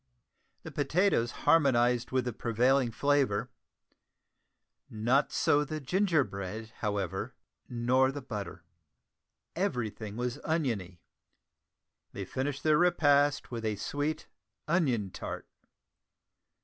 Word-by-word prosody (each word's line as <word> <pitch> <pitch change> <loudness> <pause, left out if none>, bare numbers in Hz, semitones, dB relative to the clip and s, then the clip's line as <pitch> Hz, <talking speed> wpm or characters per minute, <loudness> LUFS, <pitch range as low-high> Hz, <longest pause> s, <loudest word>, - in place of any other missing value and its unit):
The - - -8
potatoes 165 - +1
harmonised 125 -6 +4
with 130 -1 0
the 125 - -2
prevailing 125 +3 +2
flavour; 135 -3 +1 1.4
not 120 +6 +1
so 145 +1 +3
the 155 +1 -4
ginger 165 +2 +2
bread, 105 +2 -6
however, 100 -4 -3 0.3
nor 125 +2 +2
the 140 -1 -7
butter. 105 -8 -6 0.9
Everything 115 - -2
was 125 0 -2
oniony; 115 - -2 1.1
they 100 - -5
finished 135 +6 -3
their 155 0 +4
repast 145 -6 +3
with 115 -2 -4
a 110 -1 0
sweet 145 +9 -3 0.4
onion 130 - +1
tart! - - -6
125 Hz, 100 wpm, -30 LUFS, 110-145 Hz, 1.4 s, harmonised